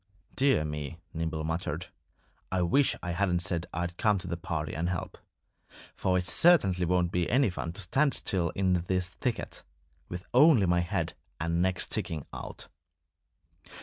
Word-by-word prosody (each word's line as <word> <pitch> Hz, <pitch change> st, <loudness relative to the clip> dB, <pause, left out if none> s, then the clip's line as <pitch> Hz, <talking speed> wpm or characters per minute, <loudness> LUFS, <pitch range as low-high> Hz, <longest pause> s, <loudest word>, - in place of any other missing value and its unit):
"Dear 135 Hz, -, +3 dB
me!" 75 Hz, +1 st, -5 dB, 0.2 s
Nimble 80 Hz, -1 st, -2 dB
muttered. 80 Hz, +1 st, -3 dB, 0.6 s
"I 95 Hz, -1 st, +1 dB
wish 135 Hz, +11 st, +3 dB
I 90 Hz, -, -2 dB
hadn't 90 Hz, 0 st, +1 dB
said 85 Hz, -2 st, -2 dB
I'd 85 Hz, 0 st, -3 dB
come 105 Hz, -3 st, +3 dB
to 90 Hz, -, -7 dB
the 85 Hz, -, -2 dB
party 80 Hz, -2 st, -3 dB
and 85 Hz, +3 st, -1 dB
help. 90 Hz, -3 st, -4 dB, 0.8 s
For 90 Hz, -1 st, +1 dB
it 90 Hz, -, -1 dB
certainly 95 Hz, -, +4 dB
won't 90 Hz, -1 st, +2 dB
be 90 Hz, -2 st, 0 dB
any 130 Hz, -5 st, +3 dB
fun 85 Hz, -2 st, -4 dB
to 100 Hz, -, -5 dB
stand 135 Hz, -, +2 dB
still 90 Hz, -3 st, 0 dB
in 95 Hz, -1 st, +2 dB
this 90 Hz, -1 st, 0 dB
thicket, 120 Hz, +5 st, -4 dB, 0.5 s
with 90 Hz, +1 st, -6 dB
only 130 Hz, -5 st, +6 dB
my 85 Hz, -1 st, +3 dB
head 85 Hz, -1 st, -1 dB, 0.3 s
and 85 Hz, +1 st, 0 dB
neck 95 Hz, 0 st, +1 dB
sticking 80 Hz, -4 st, -3 dB
out." -, -, -8 dB
90 Hz, 160 wpm, -29 LUFS, 85-95 Hz, 0.8 s, only